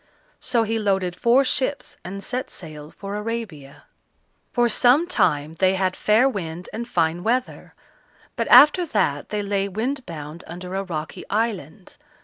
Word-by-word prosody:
So 235 Hz, -2 st, +1 dB
he 225 Hz, +1 st, -1 dB
loaded 190 Hz, -4 st, 0 dB
four 240 Hz, +7 st, +4 dB
ships 270 Hz, +2 st, -1 dB
and 195 Hz, +2 st, -7 dB
set 255 Hz, +1 st, -4 dB
sail 155 Hz, -3 st, -9 dB
for 200 Hz, +4 st, -8 dB
Arabia. 210 Hz, -11 st, -6 dB, 0.7 s
For 240 Hz, -4 st, +2 dB
some 250 Hz, +7 st, +4 dB
time 155 Hz, -, +1 dB
they 190 Hz, 0 st, +3 dB
had 185 Hz, -1 st, 0 dB
fair 220 Hz, +5 st, +3 dB
wind 180 Hz, -7 st, -5 dB
and 235 Hz, +2 st, -5 dB
fine 165 Hz, 0 st, 0 dB
weather, 250 Hz, +4 st, -2 dB, 0.6 s
but -, -, -2 dB
after 295 Hz, +8 st, +7 dB
that 195 Hz, -, -1 dB
they 210 Hz, -1 st, -2 dB
lay 200 Hz, 0 st, -1 dB
wind 245 Hz, +8 st, -3 dB
bound 155 Hz, 0 st, -8 dB
under 180 Hz, +2 st, -8 dB
a 195 Hz, -, -1 dB
rocky 160 Hz, -4 st, -6 dB
island. 200 Hz, -6 st, -3 dB
200 Hz, 150 wpm, -23 LUFS, 175-235 Hz, 0.7 s, after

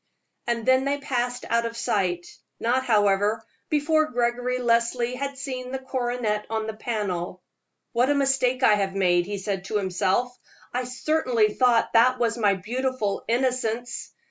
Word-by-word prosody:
And 235 Hz, -2 st, -1 dB
then 260 Hz, 0 st, +4 dB
they 280 Hz, +1 st, +1 dB
passed 245 Hz, -3 st, -2 dB
out 230 Hz, 0 st, +1 dB
of 230 Hz, 0 st, -8 dB
sight 180 Hz, -6 st, 0 dB, 0.3 s
not, 255 Hz, +3 st, +1 dB
however, 210 Hz, 0 st, +2 dB, 0.2 s
before 310 Hz, +1 st, +2 dB
Gregory 245 Hz, +1 st, 0 dB
Leslie 235 Hz, 0 st, +1 dB
had 275 Hz, +1 st, -4 dB
seen 255 Hz, -2 st, -5 dB
the 265 Hz, -, -2 dB
coronet 245 Hz, -5 st, -2 dB
on 220 Hz, -1 st, -2 dB
the 220 Hz, -, -4 dB
panel. 200 Hz, -6 st, -3 dB, 0.5 s
"What 245 Hz, +3 st, +2 dB
a 290 Hz, -, +3 dB
mistake 270 Hz, -2 st, +1 dB
I 215 Hz, -, +6 dB
have 195 Hz, -2 st, 0 dB
made," 175 Hz, -2 st, +2 dB
he 205 Hz, 0 st, -3 dB
said 195 Hz, -1 st, -3 dB
to 210 Hz, -, -1 dB
himself. 195 Hz, +6 st, 0 dB, 0.4 s
"I 250 Hz, +1 st, -1 dB
certainly 250 Hz, -5 st, +1 dB
thought 245 Hz, -3 st, +3 dB
that 250 Hz, +3 st, +5 dB
was 230 Hz, -2 st, +1 dB
my 205 Hz, -4 st, +2 dB
beautiful 235 Hz, +1 st, -2 dB
'Innocence.' 245 Hz, -1 st, -1 dB
235 Hz, 155 wpm, -25 LUFS, 210-255 Hz, 0.5 s, I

